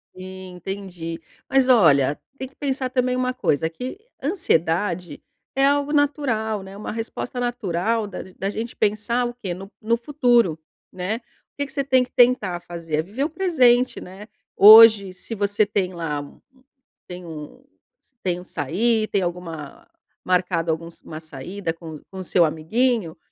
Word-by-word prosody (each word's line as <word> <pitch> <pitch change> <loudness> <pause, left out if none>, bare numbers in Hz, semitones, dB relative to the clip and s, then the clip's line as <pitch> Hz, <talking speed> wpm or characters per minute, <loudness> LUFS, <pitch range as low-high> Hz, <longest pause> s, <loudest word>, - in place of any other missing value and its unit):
Sim, 185 0 -9
entendi. 180 -3 -6 0.3
Mas 270 -1 +3
olha, 150 - +5 0.2
tem 265 - -5
que 265 - -24
pensar 270 -2 -2
também 250 0 0
uma 255 0 0
coisa, 160 - 0
que 250 - -7 0.2
ansiedade 175 - 0 0.3
é 270 +1 +4
algo 285 +1 +2
natural, 260 -8 0
né, 190 +1 -11
uma 210 - -5
resposta 230 +3 -5
natural 225 -3 -1
da 200 - -7 0.2
da 195 - -2
gente 225 +3 -5
pensar 215 +3 0
o 240 - -4
quê? 215 -8 -5
No 195 +3 -10
no 230 +2 +1
futuro, 240 - +2 0.3
né. 185 +4 -3
O - - -14 0.4
que 285 - 0
que 270 - -12
você 275 - 0
tem 260 -2 +3
que - - -27
tentar 215 -8 +3
fazer? 170 -3 -4
É - - +2
viver 215 +10 -3
o - - -2
presente, 260 -8 +3
né. 190 +3 -11 0.3
Hoje, 215 -2 +9
se 185 +5 -6
você 205 +1 +2
tem 195 -3 -1
lá, 165 -4 -3
u 145 - -13
u 260 0 -27 0.4
tem 180 0 -8
um 160 - -9 0.6
tem 180 -2 -1
um 180 - -12
sair, 215 - 0
tem 200 - 0
alguma 170 -5 -6 0.4
marcado 180 -2 +1
alguns 165 +1 -6
uma 155 - -8
saída 165 +4 -5
com 165 -2 -10
com 190 - -8
o - - -4
seu 175 -1 +3
amiguinho, 180 +3 0
200 Hz, 165 wpm, -23 LUFS, 175-245 Hz, 0.6 s, Hoje